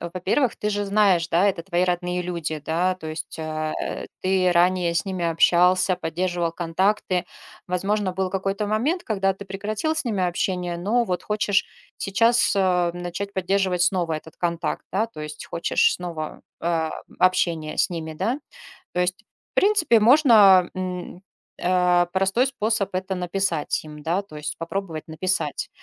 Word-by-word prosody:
во-первых, 185 +9 0
ты 210 - -2
же 205 0 -1
знаешь, 195 -4 +3
да? 170 +4 +3
Это 190 -4 0
твои 175 0 0
родные 180 0 -1
люди, 170 -3 -3
да? 175 +4 +1
То 170 -4 -10
есть, 155 +1 -6
э, 155 -1 -3 0.2
ты 185 -1 +2
ранее 175 0 +2
с 170 - +1
ними 185 -3 -3
общался, 180 +3 +4
поддерживал 175 0 -2
контакты. 180 +2 0 0.4
Возможно, 195 +2 0
был 190 0 -2
какой-то 195 +2 -2
момент, 250 - 0
когда 195 -3 0
ты 200 - -10
прекратил 210 +10 -2
с 315 -1 -1
ними 210 -6 -1
общение. 180 -1 -2
Но 220 +7 +1
вот 180 -5 -2
хочешь 210 -1 +1 0.3
сейчас, 230 +5 +3
э, 180 -2 +2
начать 175 +3 -5
поддерживать 190 -1 +1
снова 175 -3 +1
этот 155 +1 -8
контакт, 170 -1 -2
да? 210 +5 +1
То 225 -9 -11
есть 150 0 -7
хочешь 170 - +2
снова, 165 -3 -6 0.2
э, - - -4 0.4
м, - - -19
общение 170 -4 +1
с - - +2
ними, 160 -2 -5
да? 240 - -1 0.6
То 180 - -1
есть 180 +5 -1 0.3
в - - -69
принципе, 390 - +4
можно, 215 - +6
м, 180 -1 -5 0.4
э, 180 -1 +3
простой 195 +7 +2
способ- 220 -5 -1
это 185 +1 -2
написать 180 -3 -1
им, 150 -1 -11
да? 170 +5 0
То 175 -6 -14
есть 150 0 -5
попробовать 165 -2 -5
написать 180 +4 -2
185 Hz, 160 wpm, -23 LUFS, 170-200 Hz, 0.6 s, можно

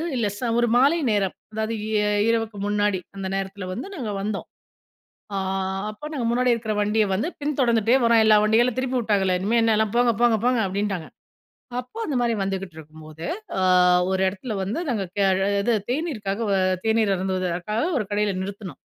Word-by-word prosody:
இல்ல 230 -4 +1
ச - - -14 0.2
ஒரு 240 - +3
மாலை 280 +6 +4
நேரம். 200 -3 0 0.2
அதாவது 220 +1 -2
இ - - -4 0.4
இரவுக்கு 225 -2 -1
முன்னாடி 205 -2 +1 0.2
அந்த 195 -1 -4
நேரத்தில 195 0 -4
வந்து 245 - -5
நாங்க 240 - -4
வந்தோம். 205 0 -3 0.9
ஆ - - 0 0.5
அப்போ 215 +7 -9
நாங்க 260 -6 -2
முன்னாடி 250 0 +3
இருக்கிற 220 -2 -2
வண்டிய 210 +1 +2
வந்து 205 +11 0
பின் 290 -1 -2
தொடர்ந்துகிட்டே 235 0 +3
வர்றோம். 230 -1 +5
எல்லா 215 -1 +6
வண்டிகளும் 230 +3 +3
திருப்பி 255 -1 0
உட்டாங்களே 195 -4 +1
இனிமே 225 +4 +2
என்னலாம் 220 -1 +2
போங்க 240 -1 +4
போங்க 235 -2 +4
போங்க 250 -2 +3
அப்படின்ட்டாங்க. 195 -3 -2 0.7
அப்போ 250 - -9
அந்த 290 - -2
மாதிரி 235 -1 +1
வந்துகிட்டு 195 -3 -4
இருக்கும்போது, 155 +1 -11 0.3
அ - - 0 0.5
ஒரு 190 0 0
இடத்துல 205 +5 -6
வந்து 205 - -2
நாங்க 205 -5 -1 0.6
இது 235 +4 +1 0.2
தேநீருக்காக 235 - -2 0.4
தேநீர் 220 -3 +2
அருந்துவதுக்காக 185 +3 -2 0.2
ஒரு 215 - -2
கடையில 205 -2 0
நிறுத்துனோம். 200 -3 -7
215 Hz, 160 wpm, -24 LUFS, 195-235 Hz, 0.9 s, எல்லா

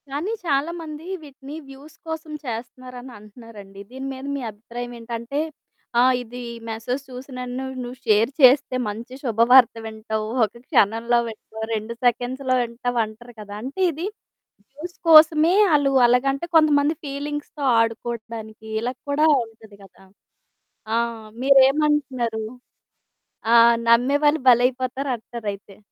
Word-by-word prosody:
కానీ 300 +10 -3
చాలామంది 315 +1 -2 0.2
వీటిని 280 0 -11
వ్యూస్ 275 +3 -14
కోసం 320 -1 -6
చేస్తున్నారని 250 +2 -7
అంటున్నారండి. 210 -2 -13
దీని 265 +1 -6
మీద 265 +1 -9
మీ - - -5
అభిప్రాయం 240 +3 -8
ఏంటంటే 235 +4 -5 0.6
ఆ! - - +6 0.2
ఇది 245 +1 -9 0.3
మెసేజ్ 230 +4 -3
చూసినన్ను 255 0 -6 0.2
నువ్వు 245 +1 -8
షేర్ 220 +1 +3
చేస్తే 260 0 +6
మంచి 230 +5 -8
శుభవార్త 235 +1 +5
వింటావు. 220 0 -4 0.2
ఒక 210 - -1
క్షణంలో 230 +3 +2
వింటావు 220 0 -9
2 220 +1 -3
సెకండ్స్‌లో 255 +2 0
వింటావు 240 +1 -3
అంటారు 230 +3 -13
కదా! 205 -1 -8
అంటే, 270 +9 -7
ఇది 320 +4 -5 0.6
వ్యూస్ 315 +6 -9
కోసమే 315 +1 +7 0.2
ఆళ్ళు 285 -2 +3 0.2
అలాగంటే, 270 +5 +1
కొంతమంది 300 -1 +4
ఫీలింగ్స్‌తొ 290 +1 -5 0.2
ఆడుకోటానికి, 225 -1 -4
ఇలాగ 250 +2 -3
కూడా 300 +2 +3 0.2
ఉంటది 220 -2 -17
గదా! 195 0 -19 0.9
ఆ! - - +2 0.5
మీరేమంటున్నారు? 270 -4 +3 1.1
ఆ! - - +7 0.3
నమ్మేవాళ్ళు 285 +6 +3
భలైపోతారు 255 +2 +1
అంటారైతే. 205 -4 -8
250 Hz, 115 wpm, -22 LUFS, 225-280 Hz, 1.1 s, కోసమే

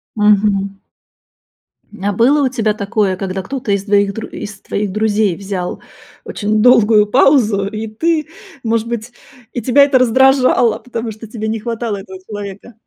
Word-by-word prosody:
Мгм. 205 -2 +2 1.2
А 205 +1 0
было 270 +8 +3
у 260 - +2
тебя 220 -4 0
такое, 200 -1 -1
когда 190 0 -4
кто-то 255 -1 -4
из 200 0 0
твоих 200 -1 +2
дру 225 - -6
из 200 -1 -8
твоих 200 -1 -3
друзей 210 -3 +1
взял 190 -3 -5 0.4
очень 210 0 -1
долгую 220 -3 +5
паузу, 225 -4 +3
и 220 +1 -5
ты, 310 +8 -1 0.4
может 230 0 0
быть, 235 0 -5 0.4
и 240 - -4
тебя 265 +5 +5
это 275 -2 +3
раздражало, 255 -1 +3
потому 230 -2 -5
что 220 +2 -11
тебе 220 0 -5
не 220 0 -2
хватало 230 -2 -3
этого 190 -1 -10
человека? 205 +2 -8
215 Hz, 155 wpm, -16 LUFS, 200-240 Hz, 1.2 s, долгую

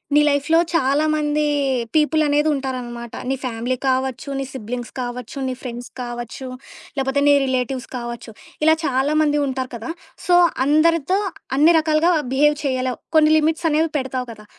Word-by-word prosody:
నీ 295 - +6
లైఫ్‌‌లో 290 +3 +3
చాలామంది 300 0 +1 0.5
పీపుల్ 310 +1 +3
అనేదుంటారనమాట. 265 -5 -1 0.2
నీ 270 - +1
ఫ్యామిలీ 245 0 -2
కావచ్చు, 260 +2 -1
నీ 275 - -2
సిబ్లింగ్స్ 245 -1 -6
కావచ్చు, 245 +1 -5
నీ 260 - -2
ఫ్రెండ్స్ 245 -1 -7
కావచ్చు, 240 +1 -6 0.5
లేపోతే 270 +1 0
నీ 290 - +7
రిలేటివ్స్ 260 -1 -2
కావచ్చు. 235 -1 -7 0.3
ఇలా 315 +1 +6
చాలామంది 295 +3 +2
ఉంటారు 260 -1 -3
కదా! 230 +1 -7 0.4
సో 355 - +4 0.3
అందరితో 330 +4 +3 0.4
అన్ని 315 +4 +6
రకాలుగా 315 +2 +2 0.2
బిహేవ్ 295 +3 +3
చేయలేవు. 255 -2 -1 0.2
కొన్ని 310 -1 +6
లిమిట్స్ 320 +2 +1
అనేవి 315 +1 +1
పెడతావు 260 -2 -3
కదా! 210 -2 -13
270 Hz, 135 wpm, -21 LUFS, 250-305 Hz, 0.5 s, నీ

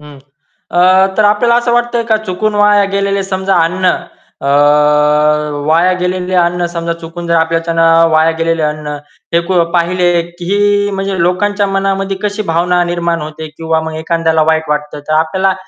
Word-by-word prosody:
हं. 150 -1 -13 0.5
अ, 175 - +2 0.3
तर 215 - +3
आपल्याला 210 +3 +3
असं 240 0 0
वाटतंय 240 0 0
का, 220 - +3
चुकून 215 0 -3
वाया 205 0 +3
गेलेले 200 0 0
समजा 190 0 -1
अन्न 185 +3 -2 0.6
अ, - - -1 1.2
वाया 170 +4 +3
गेलेले 180 0 -2
अन्न, 175 0 +1
समजा 170 -1 -3
चुकून 170 +1 -8
जर 170 - 0
आपल्याच्याने 165 0 0 0.3
वाया 160 +1 +3
गेलेलं 165 0 0
अन्न 150 -1 -5 0.4
फेकून 170 +1 +1
पाहिले 175 +1 +1 0.3
की 205 +2 +1
म्हणजे 195 0 -3
लोकांच्या 200 +4 0
मनामध्ये 195 0 -1
कशी 210 +1 -2
भावना 175 +2 +1
निर्माण 170 -1 -2
होते 155 +1 -7
किंवा 160 -1 -1
मग 160 0 -6
एखाद्याला 160 0 0
वाईट 160 -1 +1
वाटत. 150 0 -3
तर - - -1
आपल्याला 190 +4 0
175 Hz, 155 wpm, -13 LUFS, 165-195 Hz, 1.2 s, तर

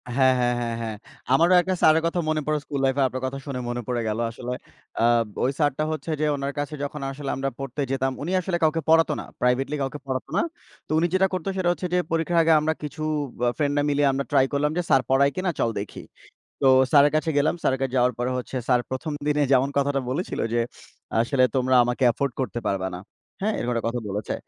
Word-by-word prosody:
হ্যাঁ, 130 -1 +5
হ্যাঁ, 120 0 +2
হ্যাঁ, 115 -1 -2
হ্যাঁ। 110 -2 -4 0.4
আমারও 170 +6 +5
একটা 185 +1 -1
স্যারের 160 +1 +5
কথা 170 +1 0
মনে 155 0 +1
পড়ে 155 0 +1
স্কুল 140 -1 -4
লাইফে 135 +1 +1
আপনার 130 0 -5
কথা 130 +1 -3
শুনে 135 -3 -4
মনে 120 0 -3
পড়ে 120 -2 -1
গেল 110 +1 -1
আসলে। 125 +1 -5 0.5
আব 120 -1 +4 0.2
ওই 130 - +2
স্যারটা 145 0 +1
হচ্ছে 155 +1 -4
যে, - - +2
উনার 140 0 -3
কাছে 145 +1 -3
যখন 145 0 -5
আসলে 140 0 -6
আমরা 135 +1 -1
পড়তে 135 +1 -4
যেতাম, 135 0 0
উনি 165 +6 -3
আসলে 185 -1 -1
কাউকে 160 +1 +2
পড়াত 165 0 +5
না, - - -6 0.2
প্রাইভেটলি 125 +4 +1
কাউকে 135 +2 -3
পড়াতো 130 -1 -3
না। - - +4 0.5
তো - - -9
উনি 170 +2 +3
যেটা 190 +1 +4
করত 185 -3 -3
সেটা 180 -2 +1
হচ্ছে 180 +1 -3
যে, - - +3
পরীক্ষার 165 +1 +1
আগে 165 - +5
আমরা 160 +1 0
কিছু 150 +1 -5 0.4
আ - - +4
ফ্রেন্ডরা 145 -1 +1
মিলিয়ে 145 0 +2
আমরা 135 +1 -2
ট্রাই 135 - +5
করলাম 145 +1 +1
যে, 180 - +2
"স্যার 135 - +5
পড়ায় 140 +1 +4
কিনা, 185 0 -1
চল 115 - +2
দেখি।" 100 - -7 0.6
তো 135 - +2 0.2
স্যারের 145 0 +6
কাছে 155 +1 0
গেলাম, 150 +4 +2
স্যারের 135 - +1
কাছে 135 -2 -1
যাওয়ার 125 0 +3
পরে 125 +1 -1
হচ্ছে 125 +1 -5
স্যার 125 -1 +4
১ম 150 +4 -3
দিনে 150 0 +2
যেমন 135 +1 +4
কথাটা 140 0 +1
বলেছিল 160 +8 -3
যে, 120 - +2 0.6
"আসলে 130 +2 +3
তোমরা 130 0 +2
আমাকে 125 +2 -2
এফোর্ড 140 +2 -2
করতে 120 -2 -2
পারবা 95 -1 -1
না।" - - -8 0.4
হ্যাঁ, 210 +2 0
এরকম 125 - -1
একটা 115 - -2
কথা 120 +1 -2
বলেছে। 100 +1 -3
140 Hz, 225 wpm, -24 LUFS, 125-155 Hz, 0.6 s, স্যারের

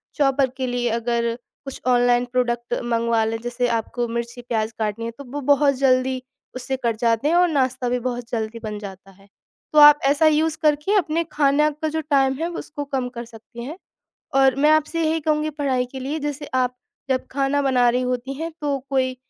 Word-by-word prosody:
Chopper 275 -2 +2
के 260 -1 -2
लिए 245 -1 -1
अगर 235 0 -1 0.3
कुछ 270 - -8
ऑनलाइन 245 0 +3
प्रोडक्ट 240 -1 -1
मँगवा 230 -1 +1
लें 225 +1 -2
जैसे 240 +1 -1
आपको 240 +2 -4
मिर्ची 235 +1 -4
प्याज 225 -2 -2
काटनी 220 +1 -2
है 230 - -3
तो 280 - -7
वो 290 - -3
बहुत 280 -1 +2
जल्दी 260 -1 +2 0.3
उससे 255 +1 -3
कट 230 - +1
जाते 230 +3 +1
हैं 340 - +2
और 355 0 +5
नाश्ता 260 -4 0
भी 250 0 0
बहुत 245 -1 -4
जल्दी 225 0 -3
बन 210 -1 -4
जाता 195 -1 -10
है। 195 +1 -22 0.5
तो 305 - +6
आप 295 0 +9
ऐसा 290 +3 +4
यूज़ 310 +1 +2
करके 300 +6 +2
अपने 335 -2 +1
खाने 295 +1 +3
का 315 - 0
जो 320 +1 -2
टाइम 275 -3 +2
है 335 +2 -1
उसको 295 -4 -6
कम 265 -3 -2
कर 235 - -5
सकती 235 +1 -11
हैं। 300 +8 -7 0.6
और 270 -1 +5
मैं 300 - +5
आपसे 310 +2 +2
यही 320 +1 +1
कहूँगी 305 0 0
पढ़ाई 275 -4 -1
के 265 - -6
लिए 280 +4 -3
जैसे 290 0 -4
आप 250 -1 +1 0.3
जब 255 -1 0
खाना 280 +1 0
बना 250 -3 +3
रही 250 +1 0
होती 250 +1 -2
हैं 325 +4 -4
तो 285 -2 -1
कोई 260 -1 0
260 Hz, 200 wpm, -22 LUFS, 240-290 Hz, 0.6 s, आप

